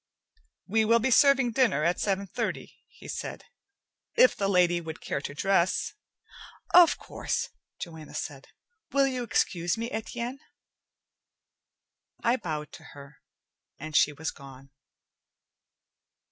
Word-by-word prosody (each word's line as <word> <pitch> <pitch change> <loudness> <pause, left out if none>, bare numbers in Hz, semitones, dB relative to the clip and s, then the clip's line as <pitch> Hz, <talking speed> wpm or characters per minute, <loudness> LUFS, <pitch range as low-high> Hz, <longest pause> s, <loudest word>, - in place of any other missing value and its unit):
"We 220 +3 +2
will 230 +2 +4
be 250 +3 0
serving 270 -2 +5
dinner 230 - +2
at 170 +2 +1
seven 200 -1 0
thirty," - - -4
he - - -15
said. - - -6 0.7
"If - - +6
the 200 - -1
lady 175 -2 +3
would 160 -1 -7
care 140 - -3
to 145 - -6
dress 190 +2 +1 0.4
" - - -17
"Of 340 - +4
course," - - -3 0.3
Joanna 160 -3 -9
said. 135 -3 -6 0.4
"Will 275 0 +4
you 255 -2 -2
excuse 175 -6 0
me, 230 +2 -4
Etienne?" 235 +4 -4 1.8
I 235 +2 +3
bowed 155 - -5
to - - -12
her, 140 0 -13 0.6
and 155 0 -7
she 150 - +5
was 150 +1 -4
gone. 135 0 -14
190 Hz, 130 wpm, -28 LUFS, 155-235 Hz, 1.8 s, If